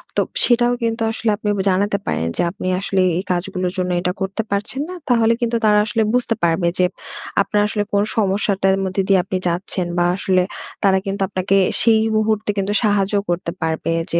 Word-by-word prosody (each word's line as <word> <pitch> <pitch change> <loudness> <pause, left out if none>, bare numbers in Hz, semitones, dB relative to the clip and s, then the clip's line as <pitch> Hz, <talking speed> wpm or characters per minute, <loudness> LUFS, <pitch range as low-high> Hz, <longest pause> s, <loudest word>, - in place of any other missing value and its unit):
তো - - +3 0.2
সেটাও 240 0 +3
কিন্তু 230 0 -1
আসলে 225 0 -2
আপনি 210 -1 -3
ব - - -3
জানাতে 200 +2 +1
পারেন 80 - -1
যে - - +1
আপনি 185 -1 -6
আসলে 195 -1 0 0.2
এই 185 - -2
কাজগুলোর 185 0 -2
জন্য 180 -1 -1
এটা 180 - 0
করতে 195 +3 -1
পারছেন 210 +7 -2
না। 365 - -6
তাহলে 230 -2 +4
কিন্তু 235 0 0
তারা 210 -1 +5
আসলে 220 +1 -1
বুঝতে 245 -2 +1
পারবে 170 +1 +2
যে 180 - +5 0.6
আপনার 205 +1 +1
আসলে 210 0 -1
কোন 200 0 +3
সমস্যাটার 195 -2 +1
মধ্যে 190 +1 -1
দিয়ে 195 -2 +4
আপনি 185 0 -3
যাচ্ছেন। 175 +1 -2
বা 175 - +3
আসলে 185 -1 +1 0.4
তারা 195 -1 +4
কিন্তু 195 0 -3
আপনাকে 190 0 0 0.2
সেই 225 -1 +5 0.2
মুহূর্তে 215 -1 0
কিন্তু 195 +1 -1
সাহায্যও 205 -1 +2
করতে 175 -1 -1
পারবে 160 0 -1 0.2
যে 170 - +2
195 Hz, 190 wpm, -20 LUFS, 185-215 Hz, 0.6 s, তারা